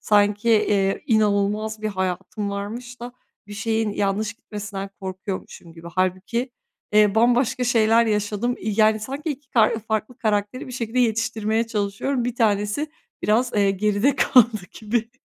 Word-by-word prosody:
sanki, 205 +2 +2
eee, 205 -3 +2
inanılmaz 215 -1 +1
bir 215 - 0
hayatım 190 +1 -3
varmış 235 +5 -6
da 240 +1 -7 0.3
bir 205 - -10
şeyin 220 0 -1
yanlış 205 +1 -1
gitmesinden 205 -2 -7
korkuyormuşum 185 -2 -6
gibi. 165 +1 -11
Hâlbuki, 185 +8 -1 0.4
eee, 210 -1 +5
bambaşka 245 +2 +2
şeyler 230 -1 +4
yaşadım. 210 +3 0
İii, 215 0 -1
yani, 215 0 +4
sanki 275 +8 -4
2 285 -1 -7
ka 220 -3 +4 0.2
farklı 220 +3 -2
karakteri 215 +2 -1
bir 255 - -8
şekilde 235 0 -3
yetiştirmeye 225 -1 0
çalışıyorum. 230 +4 -1
1 245 -1 -2
tanesi 210 +4 +1 0.4
biraz, 240 +4 +2
eee, 200 -2 +3
geride 210 +7 +1
kaldı 235 -4 +4 0.2
gibi. 225 +1 -1
215 Hz, 140 wpm, -23 LUFS, 205-235 Hz, 0.4 s, eee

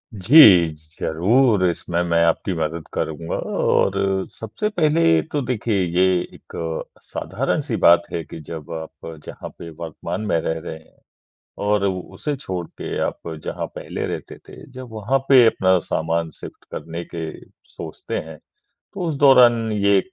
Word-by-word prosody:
जी। 115 - +6 0.6
ज़रूर 100 +5 +3
इसमें 85 0 -2
मैं 85 -1 +2
आपकी 85 +3 0
मदद 80 +1 -3
करूँगा 80 +1 -3
और 100 0 +1 0.4
सबसे 115 - -3
पहले 155 - +3
तो 145 - 0
देखिए 115 -5 0 0.2
ये 95 - +5 0.3
एक - - -18 0.5
साधारण-सी - - -2
बात 85 0 +6
है 85 - -2
कि - - -9
जब 80 +1 -8
आप 80 0 -8 0.2
जहाँ - - -8
पे 85 - -8
वर्तमान 85 +3 -6
में 85 - +2
रह 80 0 -2
रहे 80 -1 -7
हैं। 80 - -22 0.7
और 105 -1 +2
उसे 95 - -3
छोड़ 90 -9 -5
के - - -4
आप - - -6 0.2
जहाँ - - -3
पहले - - -5
रहते - - -6
थे - - -12
जब 130 0 -8
वहाँ 110 +5 0
पे 130 -3 +8
अपना 95 -4 +3
सामान 80 0 -1
शिफ़्ट - - -10
करने 85 +1 -6
के 80 -1 -3 0.4
सोचते - - -6
हैं। 80 -2 -10 0.6
तो 195 - -6
उस 155 - -1
दौरान 120 -5 +6
ये 100 -1 +3
95 Hz, 150 wpm, -21 LUFS, 80-115 Hz, 0.7 s, पे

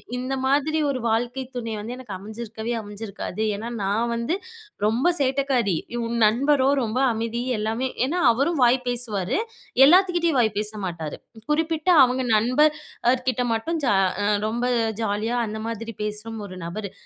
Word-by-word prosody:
இந்த 255 +2 -3
மாதிரி 290 +3 +2
ஒரு 265 -2 -1
வாழ்க்கை 240 +3 0
துணை 230 -2 -3
வந்து 220 +4 -5
எனக்கு 250 -5 -9
அமஞ்சிருக்கவே 220 +3 -6
அமஞ்சிருக்காது. 205 -1 -6
ஏன்னா, 220 +3 -5
நான் 210 +4 0
வந்து 235 +8 -1 0.5
ரொம்ப 230 +9 +2
சேட்டக்காரி. 265 -7 +1 0.3
உன் 235 +1 -2
நண்பரோ 260 +5 +3
ரொம்ப 235 +2 -1
அமைதி 230 +1 -2 0.2
எல்லாமே. 225 +5 -1 0.2
ஏன்னா 335 +7 -1
அவரும் 275 +8 0
வாய் 245 +1 +5
பேசுவாரு. 235 - -1 0.5
எல்லாத்துக்கிட்டேயும் 345 -2 +4
வாய் 220 -2 +3
பேச 210 0 -1
மாட்டாரு. 165 -4 -5 0.3
குறிப்பிட்ட 320 +2 0
அவங்க 255 +1 +1
நண்பர் 255 +8 +4 0.4
அவர் 255 +1 +3
கிட்ட 250 -1 0
மட்டும் 325 +9 -2
ஜா 240 - +3 0.3
அ - - +1 0.2
ரொம்ப 235 +3 -1 0.4
ஜாலியா 220 +3 -1
அந்த 215 +1 -5
மாதிரி 230 0 -5
பேசும் 210 +1 -5
ஒரு 185 -1 -9
நபரு. 200 +3 -5
235 Hz, 150 wpm, -24 LUFS, 215-265 Hz, 0.5 s, வாய்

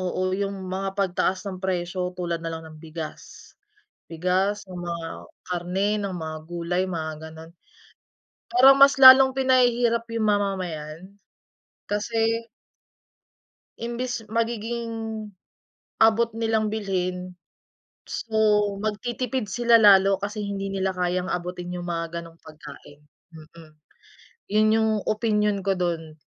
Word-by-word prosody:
oo, 185 0 -2
yung 195 -1 -3
mga 195 +1 -3
pagtaas 190 0 0
ng 185 -2 -6
presyo 180 -1 -3
tulad 170 -2 -3
na 165 - -4
lang 160 0 -6
ng 155 -1 -12
bigas. 160 -1 -9 0.6
Bigas, 185 +5 0
ng 180 -1 -7
mga 170 -1 -5 0.4
karne, 180 +3 -1
ng 200 -2 -3
mga 160 -2 -5
gulay, 175 +1 -1
mga 160 -3 -3 0.2
gano'n. 160 +1 -12 1.0
Parang 265 +2 +7
mas 275 -1 +6
lalong 265 0 +10
pinahihirap 245 -3 +3
yung 225 -2 0
mamamayan, 185 -3 -2 0.7
kasi 225 +2 0 1.4
imbes 235 0 -3
magiging, 230 +1 -2 1.1
abot 225 +1 +4
nilang 220 -1 0
bilhin, 185 -3 -3 0.7
so, 225 - -6 0.5
magtitipid 240 +3 -2
sila 235 +3 +3
lalo 195 -2 +6
kasi 210 +1 -4
hindi 195 -1 -4
nila 190 0 -1
kayang 180 +1 -1
abutin 180 0 -4
'yong 175 0 -5
mga 165 0 -3
gano'ng 165 0 -14
pagkain. 150 -1 -13 0.4
Mm. 155 0 -15 0.8
Yun 215 0 +4
yung 220 0 +2 0.2
opinyon 210 -2 +1
ko 195 - +2
do'n. 165 -3 -2
195 Hz, 115 wpm, -24 LUFS, 175-220 Hz, 1.4 s, lalong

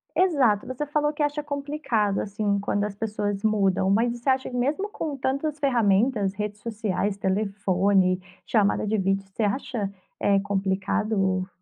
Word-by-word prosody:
Exato. 275 - +3
Você 255 +3 -3
falou 295 +1 0
que 295 - -1
acha 290 +1 0
complicado, 280 -8 -1
assim, 200 0 -1
quando 205 0 -1
as 210 -1 -3
pessoas 205 -2 -2
mudam, 195 -3 +2
mas 230 +4 +3
você 240 +3 -2
acha 260 0 +1
mesmo 285 +12 -1
com 315 -8 -4
tantas 275 +3 -1
ferramentas, 225 -6 +2
redes 210 0 -4
sociais, 210 -3 -2
telefone, 195 -1 +1 0.3
chamada 210 -2 +2
de 215 +1 0
vídeo, 195 0 0
você 220 - -2
acha, 210 0 -1 0.3
eh, 200 -1 +3
complicado 195 -1 0
210 Hz, 145 wpm, -25 LUFS, 195-265 Hz, 0.3 s, Exato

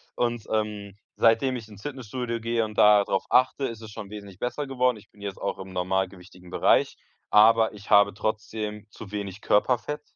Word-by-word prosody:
Und, 120 -2 -1
ähm, 105 -2 -2 0.2
seitdem 120 +3 +3
ich 115 - -9
ins 105 -2 -14
Fitnessstudio 125 -3 -4
gehe 115 0 0
und 105 -1 -6
da 105 -1 +7
drauf 95 -1 -1
achte, 130 +2 +3
ist 115 -3 -5
es 110 -1 -10
schon 105 -1 -8
wesentlich 100 -3 -10
besser 125 +4 -3
geworden. 125 -2 +1
Ich 105 - -17
bin 105 - -23
jetzt 100 -2 -5
auch - - -3
im 95 0 -9
normalgewichtigen 90 0 -3
Bereich, 90 - +2 0.4
aber 110 +1 +5
ich 105 0 -13
habe 100 0 +6
trotzdem 105 0 -4
zu 105 -2 -11
wenig 100 -1 -5
Körperfett 125 +7 +1
105 Hz, 185 wpm, -26 LUFS, 100-115 Hz, 0.4 s, da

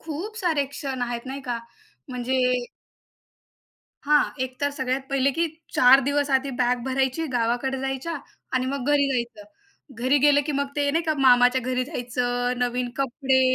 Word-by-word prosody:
खूप 330 +8 -6
सारे 325 -9 +1
क्षण 270 -2 -5
आहेत, 240 +1 -4
नाही 270 +1 -5
का? 245 -2 -3 0.5
म्हणजे 255 +1 -1 1.6
हां, 295 0 +5 0.2
एक 255 0 -5
तर 285 0 +1
सगळ्यात 260 -1 -2
पहिले 275 0 +2
की 330 +5 0 0.3
4 255 +2 +7
दिवस 285 0 0
आधी 270 +1 +2
बॅग 250 0 +2
भरायची 265 +4 0
गावाकडे 245 +3 0
जायच्या 270 +5 -3 0.4
आणि 255 0 +1
मग 270 -1 -3
घरी 285 -1 +3
जायचं. 235 -4 -3 0.5
घरी 255 +5 +2
गेलं 290 +1 +5
की 300 - -1
मग 280 0 0
ते 285 -1 +2
नाही 330 +3 +1
का, 315 - +1
मामाच्या 250 -1 +5
घरी 255 +1 -1
जायचं. 245 -3 -2
नवीन 245 0 -1
कपडे, 270 0 +1
265 Hz, 160 wpm, -24 LUFS, 250-285 Hz, 1.6 s, 4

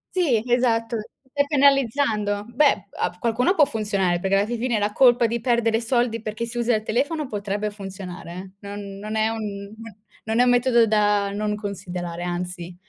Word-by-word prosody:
Sì, 290 -12 +2
esatto. 230 -1 +2 0.3
Stai 285 +1 +1
penalizzando. 270 -7 +2
Beh, 275 +4 +4
uhm, 200 - -11
a 180 0 -2
qualcuno 240 - +2
può 310 -6 +5
funzionare, 200 -7 0
perché 195 +2 +1
alla 200 - +2
fin 240 +1 -2
fine 235 -1 0
la 205 0 0
colpa 245 0 +5
di 235 +1 -2
perdere 230 -2 +1
soldi 240 -1 0
perché 215 +1 -4
si 235 +1 -7
usa 240 0 +2
il 215 - -1
telefono 285 +7 -1
potrebbe 205 -1 -3
funzionare, 190 -4 -8
eh. 185 +2 -8 0.2
Non 200 -1 -7
non 215 +2 -5
è 220 0 +2
un 205 -3 -5 0.5
non 220 +1 -1
è - - +7
un 250 - +3
metodo 245 -1 +4
da 205 -1 +2
non 210 +1 -2
considerare, 180 -4 -5
anzi. 175 0 -4
220 Hz, 180 wpm, -23 LUFS, 200-240 Hz, 0.5 s, è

